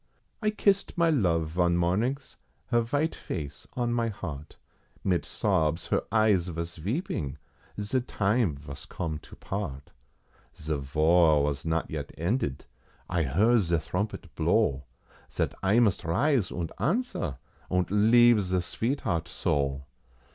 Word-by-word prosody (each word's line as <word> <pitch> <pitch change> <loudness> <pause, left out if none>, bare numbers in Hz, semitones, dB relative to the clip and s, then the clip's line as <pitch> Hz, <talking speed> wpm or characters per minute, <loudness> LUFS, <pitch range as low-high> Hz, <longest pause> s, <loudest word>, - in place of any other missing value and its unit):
I 215 - +2
kissed 200 -3 +1
my 170 -1 +4
love 85 - +1
von 85 +1 +2
mornings, 110 +11 0 0.3
her 120 -2 +3
vite 145 +7 0
face 75 -4 -6
on 120 -1 -1
my 120 -1 +1
heart, 80 -8 -6 0.5
Mit 90 -3 +1
sobs 80 +2 +1
her - - +2
eyes 105 -5 +3
vos 85 0 -5
veeping, 105 - -2 0.4
ze 105 +6 0
time 105 - +1
vos 70 0 -9
come 80 -3 -4
to - - -14
part. 70 -9 -5 0.7
Ze 80 +1 -3
Var 75 +2 +4
vas 70 0 -2
not 80 0 -1
yet - - -4
ended, 85 - -1 0.5
I 85 - +2
heard 100 - +3
ze 85 -4 +1
thrompet 95 +5 -3
blow, 80 - +1 0.5
Zat - - -1
I 100 +4 +3
must 110 -6 +2
rise, 115 - +1
und 85 -2 -4
answer, 170 - -1 0.3
und 90 -2 0
leave 115 +2 +6
ze 95 -1 -1
sveetheart 85 - -2
so! 70 -6 -1
90 Hz, 135 wpm, -28 LUFS, 80-115 Hz, 0.7 s, leave